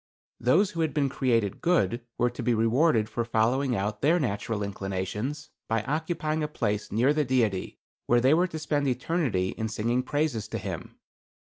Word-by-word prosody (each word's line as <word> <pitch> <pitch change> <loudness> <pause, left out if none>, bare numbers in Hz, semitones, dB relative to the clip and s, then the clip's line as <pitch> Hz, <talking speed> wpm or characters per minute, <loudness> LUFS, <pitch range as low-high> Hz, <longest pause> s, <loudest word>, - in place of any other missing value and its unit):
Those 175 - +3
who 165 - -3
had 160 -3 -1
been 140 -2 +2
created 115 -7 0
good 125 - +2 0.2
were 120 0 +2
to 120 - -6
be 120 -2 +2
rewarded 115 +1 +3
for 120 +2 -2
following 120 +3 +1
out 105 +1 -2
their 165 +5 +4
natural 105 -4 -2
inclinations, 100 +8 -4 0.2
by 110 -1 +1
occupying 155 +2 -1
a 150 - 0
place 105 -8 -2
near 120 +8 +3
the 150 0 +2
Deity, 115 -8 0 0.3
where 120 - +4
they 130 +4 +4
were 175 +3 +3
to 160 - -6
spend 150 -2 0
eternity 130 - 0
in 110 - -3
singing 115 +4 0
praises 145 -6 -1
to - - -4
him. - - -6
125 Hz, 175 wpm, -27 LUFS, 110-150 Hz, 0.3 s, their